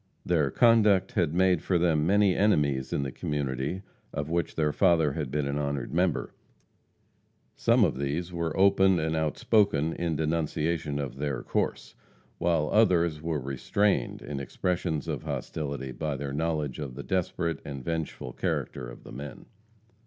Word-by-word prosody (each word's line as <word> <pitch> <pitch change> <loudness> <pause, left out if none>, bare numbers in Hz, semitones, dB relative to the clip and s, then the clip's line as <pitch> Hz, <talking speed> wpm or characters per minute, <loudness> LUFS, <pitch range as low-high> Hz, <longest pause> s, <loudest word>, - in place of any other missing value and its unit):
Their 80 -5 +2
conduct 105 - +4
had 85 -7 +1
made 90 0 +3
for 90 - +1
them 80 -3 +2
many 100 -1 +4
enemies 75 -10 +2
in - - 0
the 65 - -3
community 70 +6 -3 0.3
of 75 +2 -4
which 85 0 -1
their 75 -2 +1
father 85 -6 +3
had 75 -3 -3
been 75 +1 -1
an 70 +1 -1
honored 70 -3 -3
member. 90 +2 0 1.2
Some 115 0 +3
of 75 -8 +1
these 80 +6 -2
were 85 -2 -2
open 95 -1 +5
and 80 0 -1
outspoken 80 0 +2
in 85 -2 -2
denunciation 80 -1 -1
of 70 -2 -4
their 70 -1 -2
course, - - -2 0.5
while 80 -3 +1
others 85 -8 +3
were 80 -2 -1
restrained 70 +4 0
in 70 -1 -5
expressions 80 +2 -2
of - - -3
hostility 70 -3 -4
by 75 +2 -3
their 70 0 -4
knowledge 75 -3 -1
of 70 -4 -5
the - - -6
desperate 85 -2 -1
and 70 -3 -7
vengeful 80 -2 -4
character 60 -3 -3
of - - -12
the - - -11
men. 70 -1 -8
80 Hz, 155 wpm, -28 LUFS, 70-90 Hz, 1.2 s, open